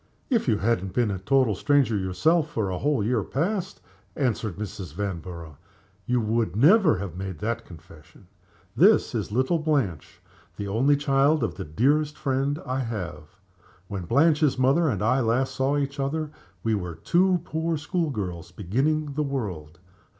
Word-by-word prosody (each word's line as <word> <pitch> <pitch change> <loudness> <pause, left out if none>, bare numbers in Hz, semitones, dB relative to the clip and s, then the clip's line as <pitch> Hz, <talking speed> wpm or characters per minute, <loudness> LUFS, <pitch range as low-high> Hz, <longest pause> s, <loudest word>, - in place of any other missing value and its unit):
"If 230 - +2
you 110 -4 +3
had 105 -2 +1
not 95 -1 -6
been 115 -2 +1
a 95 - -3
total 130 +2 +2
stranger 140 +1 +2
yourself 150 - +1
for 105 -8 -2
a 90 - -3
whole 145 -6 +1
year 115 +1 +1
past," 185 - -2 0.3
answered 110 - -1
Mrs. 95 -6 -7
Vanborough, 85 -6 -5 0.5
"you 125 0 +2
would 110 -4 0
never 160 - +5
have 90 -3 -6
made 95 -2 -5
that 115 +6 -3
confession. 80 +1 -15 0.5
This - - +4
is - - -3
little 130 +9 +1
Blanche 140 - -1 0.4
the 100 - -4
only 130 +8 +3
child 140 +1 +2
of 105 -7 -1
the - - -6
dearest 145 - +1
friend 140 +2 -1
I 130 +1 -2
have. 90 - -5 0.5
When 95 -4 -4
Blanche's 150 - +3
mother 140 +6 +3
and 105 -5 -1
I 125 +5 +3
last 130 +3 +1
saw 135 +2 +1
each 140 0 -2
other 150 +2 -2 0.3
we 115 - +1
were 90 -5 -3
two 180 - +2
poor 160 0 -1
school 160 +2 -1
girls 90 - -5
beginning 140 - -1
the 150 - -1
world. 95 - -4
120 Hz, 165 wpm, -25 LUFS, 95-145 Hz, 0.5 s, never